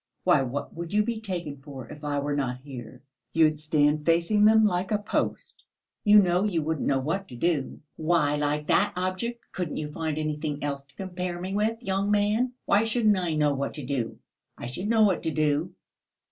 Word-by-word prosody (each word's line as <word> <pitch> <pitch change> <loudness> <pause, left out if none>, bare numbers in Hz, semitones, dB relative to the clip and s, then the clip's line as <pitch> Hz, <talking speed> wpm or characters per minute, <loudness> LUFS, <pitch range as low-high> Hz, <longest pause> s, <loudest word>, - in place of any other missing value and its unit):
Why, - - +4
what 135 +2 -4
would 170 +2 -6
you 210 0 +4
be 225 0 -3
taken 175 -8 -4
for, 135 -4 -9
if 150 - -11
I 145 -1 -1
were 145 +1 -1
not 130 -3 -1
here? 125 -2 -10 0.3
You'd 155 -2 +3
stand 150 0 +2
facing 170 +6 +3
them, 220 0 +6
like 185 -2 0
a 210 - +2
post, 205 0 -3 0.4
you 210 -1 +7
know 180 -2 +4
you 175 -7 0
wouldn't 160 -1 -1
know 135 - +3
what 165 +9 -2
to 125 - -10
do...." 150 +1 -1 0.2
"Why 155 -2 +2
like 150 0 -1
that 200 +6 +2
object? 185 +6 -2
Couldn't 175 -5 -4
you 150 -1 -4
find 155 0 -3
anything 150 -1 -3
else 140 -1 -2
to 140 0 -21
compare 180 -2 -4
me 185 +2 -4
with, 220 +3 0
young 195 -1 0
man? 210 +5 +2
Why 205 +2 +4
shouldn't 225 -2 +2
I 170 -3 -1
know 150 -1 +2
what 140 0 -3
to 150 -4 -6
do? 125 -4 -2 0.4
I - - -7
should 155 +11 -4
know 225 0 +4
what 195 -4 +3
to - - -1
do." 155 +2 0
165 Hz, 200 wpm, -27 LUFS, 145-200 Hz, 0.4 s, you